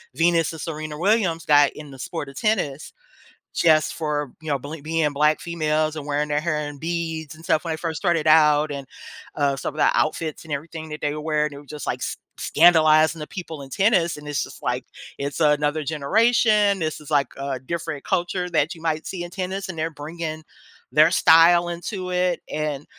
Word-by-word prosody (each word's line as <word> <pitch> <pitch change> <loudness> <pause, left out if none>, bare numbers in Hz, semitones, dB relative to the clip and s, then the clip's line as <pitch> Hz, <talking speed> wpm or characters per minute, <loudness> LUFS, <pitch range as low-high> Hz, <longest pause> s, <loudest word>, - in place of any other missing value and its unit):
Venus 165 +1 +2
and 160 - -9
Serena 155 -2 -5
Williams 185 -4 +1
got 145 -1 +5
in 150 -2 -10
the 135 - -12
sport 160 +2 -5
of 135 - -13
tennis 160 -10 -1 0.6
just 155 -2 +3
for, 150 -4 -2
you 160 - -12
know, 140 - +1
bl 145 +4 -7
being 160 -1 0
Black 150 +2 +2
females 155 -2 -1
and 145 - -6
wearing 150 +1 -1
their 150 - +1
hair 155 -1 -1
in 145 - -10
beads 160 -1 -3
and 165 - -15
stuff 165 -3 +1
when 165 - -1
they - - -4
first 160 -1 -3
started 170 -3 +1
out 150 -1 +5
and, 140 -2 -6 0.5
uh, 140 -2 +1
some 145 - -4
of - - -13
the - - +5
outfits 155 0 -1
and 150 - -5
everything 160 +2 -6
that 150 0 -7
they 145 - -1
were 150 - -5
wearing, 150 -1 0
they 140 - -10
were 145 - -12
just 150 +1 -7
like - - -2
s - - -3 0.2
scandalizing 160 -1 +5
the 150 - -6
people 165 -5 -7
in 135 - -10
tennis. 190 - +2
And 150 - -11
it's 145 -2 -1
just - - -11
like, - - -2 0.3
it's 140 +2 -4
another 150 0 +2
generation, 205 - +3
this 155 -1 -3
is 150 - -12
like 145 -2 +3
a 135 -2 -3
different 155 +1 -5
culture 180 -1 -1
that 160 0 +1
you 165 - -14
might 160 -1 -1
see 180 -2 -5
in 175 - -9
tennis 190 +1 -4
and 170 - -6
they're 160 +1 -2
bringing 155 +1 -6 0.5
their 155 +3 +6
style 170 +1 +6
into 180 +2 -5
it, 180 -1 0
and, 150 -2 -3
155 Hz, 210 wpm, -23 LUFS, 150-170 Hz, 0.6 s, their